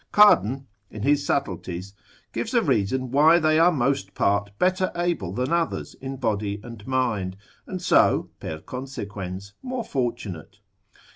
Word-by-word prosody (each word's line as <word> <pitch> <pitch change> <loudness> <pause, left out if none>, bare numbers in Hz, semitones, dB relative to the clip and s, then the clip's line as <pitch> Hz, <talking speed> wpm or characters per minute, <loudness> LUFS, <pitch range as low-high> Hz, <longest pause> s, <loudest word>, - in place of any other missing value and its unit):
Cardan, 135 - +5 0.2
in 105 - -7
his 145 +1 +3
subtleties, 95 -8 -2 0.4
gives - - -3
a - - +4
reason 125 +5 0
why 155 +5 +6
they 155 -1 +3
are 170 +2 +6
most 135 - 0
part 100 0 +1
better 185 - +2
able 170 - -1
than 125 - -1
others 170 -1 -1
in 135 0 -5
body 105 -4 -1
and 115 -3 -10
mind, 115 -8 0 0.3
and 185 - -4
so, - - +3
per 80 - -5
consequens, 100 -5 -6
more 255 -2 -3
fortunate. 115 - -4
125 Hz, 140 wpm, -25 LUFS, 100-150 Hz, 0.4 s, why